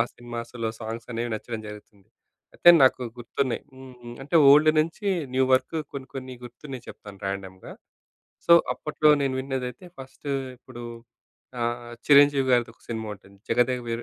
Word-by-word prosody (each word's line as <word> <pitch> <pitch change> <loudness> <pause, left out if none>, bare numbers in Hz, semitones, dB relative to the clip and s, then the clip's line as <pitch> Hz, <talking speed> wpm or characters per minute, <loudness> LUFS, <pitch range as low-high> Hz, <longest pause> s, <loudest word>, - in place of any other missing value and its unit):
సినిమాస్‌లో 120 -1 -5
సాంగ్స్ 115 +1 -6
అనేవి 115 0 -3
నచ్చడం 110 0 -7
జరుగుతుంది. 105 -1 -13 0.5
అయితే - - +4
నాకు 130 -1 +4 0.2
గుర్తున్నాయి 120 +2 -2
హ్మ్. 130 -1 -12
హ్మ్. 120 0 -9
అంటే 145 +4 +1
ఓల్డ్ 150 +2 +7
నుంచి 165 +6 -3 0.3
న్యూ 130 0 +3
వరుకు 160 +5 -1 0.2
కొన్ని 135 -1 -7
కొన్ని 130 -1 -7
గుర్తున్నాయి 125 +1 -9
చెప్తాను 100 -2 -13
ర్యాండమ్‌గా. 95 -1 -6 0.7
సో 170 - +6 0.2
అప్పట్లో 155 0 0
నేను 135 -1 0
విన్నదైతే 130 +3 -5
ఫస్ట్ 135 +2 -11 0.3
ఇప్పుడు 120 -1 -11 0.8
ఆహ్, 120 0 -3
చిరంజీవి 145 -1 +6
గారిది 120 -2 +2
ఒక - - -36
సినిమా 110 -1 -4
ఉంటుంది. 100 0 -20
జగదేక 125 +1 +1
వీరు 115 0 -3
120 Hz, 145 wpm, -25 LUFS, 115-135 Hz, 0.8 s, ఓల్డ్